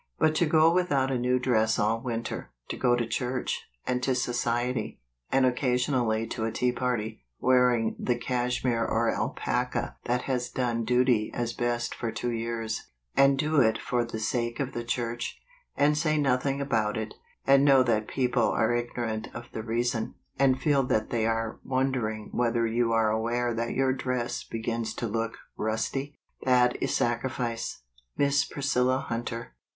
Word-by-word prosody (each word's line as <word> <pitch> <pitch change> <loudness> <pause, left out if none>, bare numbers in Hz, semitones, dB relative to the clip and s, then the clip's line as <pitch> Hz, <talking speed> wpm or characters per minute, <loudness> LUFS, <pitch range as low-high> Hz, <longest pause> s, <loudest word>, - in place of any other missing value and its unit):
" - - -50
But 155 - +3
to 170 - +3
go 160 +1 +5
without 145 -7 +2
a 130 - +1
new 125 +1 +2
dress 110 -3 +2
all 110 +2 +1
winter 115 -2 -4
— - - -49
to - - -2
go 120 -1 +3
to 120 -1 0
church, 125 +2 -2 0.2
and 125 0 0
to 130 0 +1
society, 120 0 -1 0.3
and 135 -1 +4
occasionally 125 -3 +1
to 110 - -3
a 115 - -1
tea 125 +2 +1
party, 125 - -2 0.2
wear¬ 125 -1 +4
ing 115 -1 -1
the 125 - +1
cashmere 125 -1 0
or - - +1
alpaca - - -2
that 125 +1 0
has 125 -2 -1
done 120 -3 -1
duty 125 -3 +3
as 120 -1 -1
best 120 0 -1
for 115 -2 -3
two 120 +2 -2
years, 115 -1 -3 0.3
and 140 0 +5
do 150 0 +3
it 110 -2 +3
for 120 -1 0
the 115 -1 -5
sake 120 +1 -1
of 135 -2 -2
the 120 - -3
church, 120 0 -3 0.4
and 145 +1 +4
say 155 0 +1
nothing 135 -1 +1
about 110 -7 0
it, 110 -1 -4 0.3
and 135 0 +6
know 135 -2 +6
that 110 -3 +1
people 125 -4 +1
are 110 +2 +2
ignorant 120 -2 -2
of 120 0 -8
the 110 - -4
reason, 115 0 -1 0.2
and 130 -1 +4
feel 140 0 +3
that 110 -4 0
they 115 -2 +1
are 115 -1 -1
wondering 130 -5 -1
whether 115 -1 +1
vou 115 +1 +1
are 115 -1 +3
aware 120 +2 0
that 115 +1 -2
your 135 0 +2
dress 125 -2 -2
be 115 - -6
gins 115 -1 -2
to - - -3
look 115 +1 -2 0.2
"rusty" 135 +6 -2
— - - -45
that 125 -1 +4
is - - 0
sacrifice. 120 - -1 0.3
Miss 140 -1 +3
Priscilla 130 -3 +1
Hunter. 115 - -4
120 Hz, 175 wpm, -28 LUFS, 115-130 Hz, 0.4 s, and